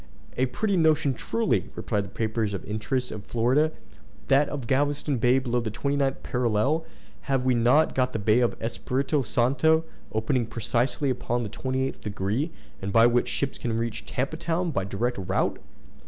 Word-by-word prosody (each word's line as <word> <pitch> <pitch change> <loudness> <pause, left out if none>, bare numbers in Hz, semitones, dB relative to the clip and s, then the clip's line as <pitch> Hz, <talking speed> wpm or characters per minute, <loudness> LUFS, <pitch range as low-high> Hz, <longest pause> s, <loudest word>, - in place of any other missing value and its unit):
"A 130 - +2
pretty 200 - -1
notion 155 -4 +3
truly," 225 - 0
replied 105 -3 -1
the - - -10
papers 110 0 -1
in - - -4
the - - -13
interest 115 +5 -2
of 105 -2 -6
Florida, 130 +8 +2 0.6
"that 140 +1 +4
of 140 -4 -4
Galveston 140 +1 +1
bay 125 +3 +4
below 125 -2 0
the 115 -2 -3
29th 140 +4 -1
parallel! 125 +7 +1 0.4
Have 135 -2 +1
we 130 - +4
not 125 +7 +4
got 130 -1 +1
the - - -2
bay 105 +2 +3
of 120 -2 +1
Espiritu 130 +5 -1
Santo, 135 +7 +3 0.3
opening 110 +2 0
precisely 120 +5 0
upon 120 -1 -1
the 105 - -4
28th 130 +4 -2
degree, 105 - -2 0.3
and 95 +1 -3
by 115 +2 +6
which 120 0 +3
ships 140 -1 -2
can 115 -2 -1
reach 115 -1 -3
Tampa 135 +5 -2
Town 170 +1 -1
by 100 -10 -1
direct 100 +4 -2
route?" 95 - 0
125 Hz, 170 wpm, -26 LUFS, 115-140 Hz, 0.6 s, by